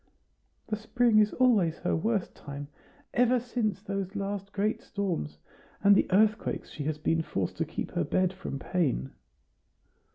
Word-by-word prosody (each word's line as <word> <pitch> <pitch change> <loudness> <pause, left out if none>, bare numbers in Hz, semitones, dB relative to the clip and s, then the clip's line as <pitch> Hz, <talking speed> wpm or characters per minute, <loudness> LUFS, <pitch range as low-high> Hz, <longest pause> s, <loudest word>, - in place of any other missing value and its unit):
"The 215 - -2
spring 225 0 +3
is 210 0 +4
always 210 -11 +3
her - - 0
worst 205 +3 0
time. 140 0 -8 0.4
Ever 245 +1 +4
since 225 -5 -2
those 195 -1 -3
last 200 0 -3
great 210 +2 0
storms, 175 - -3 0.5
and 200 0 +7
the - - +3
earthquakes 210 +2 +2
she 145 - -5
has 155 0 -1
been 160 +2 +1
forced 95 - -2
to - - 0
keep - - -5
her - - 0
bed 185 0 +1
from 185 -7 -5
pain." 135 - -1
195 Hz, 155 wpm, -29 LUFS, 160-215 Hz, 0.5 s, and